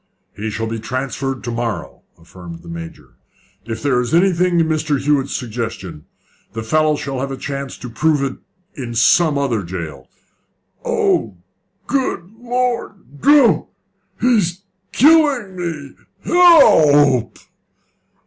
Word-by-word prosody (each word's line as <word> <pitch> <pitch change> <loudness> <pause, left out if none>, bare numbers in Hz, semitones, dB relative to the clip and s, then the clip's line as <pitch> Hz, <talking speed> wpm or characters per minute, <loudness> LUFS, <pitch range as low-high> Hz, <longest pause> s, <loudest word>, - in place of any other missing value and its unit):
"He 110 +2 -4
shall 110 +1 -3
be 115 0 -4
transferred 130 +2 -4
to 120 - -4
morrow," 115 -1 -4 0.2
affirmed 85 0 -12
the - - -14
Major. 85 0 -10 0.5
"If 115 +1 -6
there 130 -4 +2
is 125 +6 -1
anything 180 -1 +2
in 165 - +3
Mr. 155 -2 0
Hewett's 140 -1 0
suggestion, 110 - -6 0.5
the 115 - -5
fellow 155 +5 +2
shall 135 -2 -5
have 135 +1 -3
a 135 - -5
chance 140 0 -6
to - - -8
prove 145 +4 0
it 135 -1 -4 0.3
in 120 -4 -7
some 150 +6 +3
other 130 -6 0
jail. 85 -4 -7 0.7
Oh, 105 -5 0 0.5
good 255 -10 -2
Lord! 240 - -3
Don't! 285 -2 +4 0.5
He's 200 -7 +1 0.3
killing 285 - +3
me! 165 -6 -5 0.3
Help 155 - +5
p!" - - -19
140 Hz, 130 wpm, -18 LUFS, 115-175 Hz, 0.7 s, Help